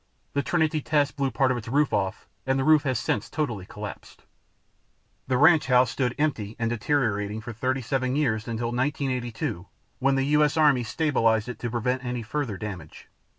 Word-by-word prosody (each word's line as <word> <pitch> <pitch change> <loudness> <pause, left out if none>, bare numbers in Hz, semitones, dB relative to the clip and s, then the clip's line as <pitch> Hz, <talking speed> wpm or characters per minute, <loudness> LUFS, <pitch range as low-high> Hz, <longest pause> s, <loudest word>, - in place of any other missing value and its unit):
The 140 - +1
Trinity 155 0 +1
test 145 0 +1
blew 140 -2 0
part 130 +1 +2
of 125 - 0
its 115 - -7
roof 145 +4 +1
off, 95 -2 -1 0.2
and 135 0 +2
the 135 - +1
roof 155 +1 +5
has 130 -3 +1
since 105 - -2
totally 120 - -3
collapsed. 105 -1 -9 1.0
The 130 -1 +1
ranch 160 +2 +5
house 125 -2 +4
stood 125 -2 -1
empty 115 -9 -1
and 115 -1 -1
deteriorating 110 -4 0
for 115 +1 -7
37 130 +2 -1
years 115 -7 0
until 115 0 -2
1982 125 - -2 0.3
when 135 +1 +2
the 135 0 +1
US 150 0 +3
Army 145 -5 +5
stabilized 115 -5 +1
it 120 -3 -7
to 120 - -3
prevent 125 +2 -1
any 125 -1 -3
further 120 -3 -3
damage. 95 -8 -8
125 Hz, 175 wpm, -26 LUFS, 110-140 Hz, 1.0 s, roof